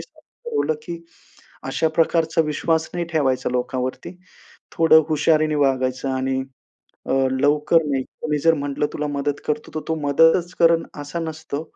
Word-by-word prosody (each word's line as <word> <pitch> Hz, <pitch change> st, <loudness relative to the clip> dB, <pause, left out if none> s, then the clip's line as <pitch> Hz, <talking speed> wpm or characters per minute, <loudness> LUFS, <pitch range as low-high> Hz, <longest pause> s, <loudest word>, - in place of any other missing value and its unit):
ठरवलं, 470 Hz, -, -4 dB
की 170 Hz, +2 st, -6 dB, 0.7 s
अशा 160 Hz, -, +1 dB
प्रकारचा 165 Hz, 0 st, +2 dB
विश्वास 160 Hz, +1 st, -1 dB
नाही 175 Hz, -1 st, -1 dB
ठेवायचा 130 Hz, -6 st, +1 dB
लोकांवरती, 125 Hz, +6 st, -3 dB, 0.6 s
थोडं 160 Hz, -1 st, +5 dB
हुशारीने 155 Hz, 0 st, +2 dB
वागायचं 130 Hz, -2 st, 0 dB
आणि 130 Hz, 0 st, -1 dB, 0.7 s
अ, -, -, -1 dB, 0.2 s
लवकर 150 Hz, +4 st, +3 dB
नाही. 135 Hz, -2 st, 0 dB, 0.2 s
कोणी 150 Hz, -1 st, 0 dB
जर 165 Hz, +3 st, +4 dB
म्हटलं, 145 Hz, 0 st, -2 dB
तुला 150 Hz, -, -3 dB
मदत 145 Hz, 0 st, -2 dB
करतो, 150 Hz, 0 st, -2 dB
तर 155 Hz, -, -2 dB
तो 160 Hz, -, +1 dB
मदतच 165 Hz, +5 st, +3 dB
करल, 165 Hz, 0 st, +5 dB, 0.2 s
असा 145 Hz, +4 st, -5 dB
नसतो, 160 Hz, -2 st, -5 dB
150 Hz, 140 wpm, -22 LUFS, 140-165 Hz, 0.7 s, थोडं